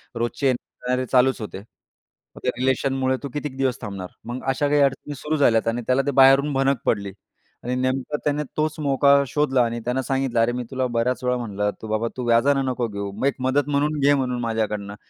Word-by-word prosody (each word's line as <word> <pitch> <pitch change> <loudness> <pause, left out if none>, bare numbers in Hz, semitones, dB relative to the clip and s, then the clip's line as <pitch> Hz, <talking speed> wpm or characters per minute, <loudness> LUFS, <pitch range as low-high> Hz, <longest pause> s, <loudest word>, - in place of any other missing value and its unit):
रोजचे 120 +3 -1
येणारे 125 0 -2
चालूच 130 +1 +3
होते. 105 - -6 0.8
मग - - -10
त्या - - +1
रिलेशनमुळे 130 0 +1
तू 140 - -4
कितीक 145 -2 -4
दिवस 130 -2 0
थांबणार. 100 -4 -6 0.2
मग 120 +2 -6
अशा 140 +2 +1
काही 145 0 +3
अडचणी 140 +1 0
सुरू 150 +4 -2
झाल्या. 115 -5 +4
आणि 120 +1 -3
त्याला 130 +1 +3
ते - - +2
बाहेरून 135 +2 +5
भनक 135 0 +2
पडली 100 -3 0 0.5
आणि 125 +1 -2
नेमकं 130 +3 -1
त्याने 150 0 0
तोच 155 0 0
मोका 140 0 +4
शोधला 135 -3 +1
आणि 115 0 -3
त्यानं 125 +2 0
सांगितलं, 135 -3 -1
"अरे, 115 +1 +3
मी 125 0 -3
तुला 130 -1 -1
बऱ्याच 120 +2 -1
वेळा 125 0 +1
म्हणलं 105 -3 -2
तू 110 - -7
बाबा 110 +2 -1
तू 125 - -3
व्याजानं 135 +4 +3
नको 125 -2 -1
घेऊ, 100 -1 -5
मग 105 +7 -4
एक 140 - 0
मदत 140 +2 +1
म्हणून 145 +1 0
घे 140 +1 +4
म्हणून 125 -3 -1
माझ्याकडनं." 105 -3 -2
मी - - -10
130 Hz, 205 wpm, -23 LUFS, 120-140 Hz, 0.8 s, बाहेरून